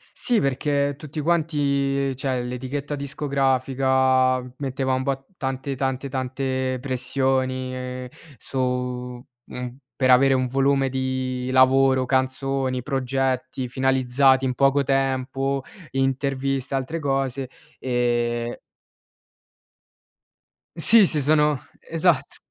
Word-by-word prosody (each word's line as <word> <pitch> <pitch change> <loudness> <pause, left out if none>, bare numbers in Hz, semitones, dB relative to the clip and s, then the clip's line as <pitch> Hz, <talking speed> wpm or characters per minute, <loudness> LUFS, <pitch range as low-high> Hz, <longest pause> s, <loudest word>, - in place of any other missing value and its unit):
Sì, 240 -3 +2
perché 140 +1 0
tutti 150 +1 -6
quanti 140 -4 0
cioè 130 -3 -1
l'etichetta 130 +4 -4
discografica, 130 -2 +1 0.2
metteva 135 -1 -2
un 130 0 0
bo 135 0 -2
tante, 135 0 -3
tante, 135 +1 -2
tante 130 0 -2
pressioni 130 -1 -2 0.3
su 125 -1 -3 0.2
mhmm, 125 0 -7 0.2
per 130 -1 +1
avere 135 +2 +6
un 130 -1 +1
volume 135 +1 +2
di 130 -1 -2
lavoro, 130 0 +4
canzoni, 130 -1 -1
progetti 130 -1 -1
finalizzati 130 0 +2
in 130 -1 0
poco 140 +2 +3
tempo, 135 0 0 0.3
interviste 135 0 -1
e - - +2
altre 155 +6 -3
cose 135 -2 -1 0.3
e 120 -1 -1 2.2
Sì, 210 +5 +7
sì, 150 -4 +2
sono 150 -1 +3 0.2
esat 165 -3 0
130 Hz, 100 wpm, -23 LUFS, 130-140 Hz, 2.2 s, Sì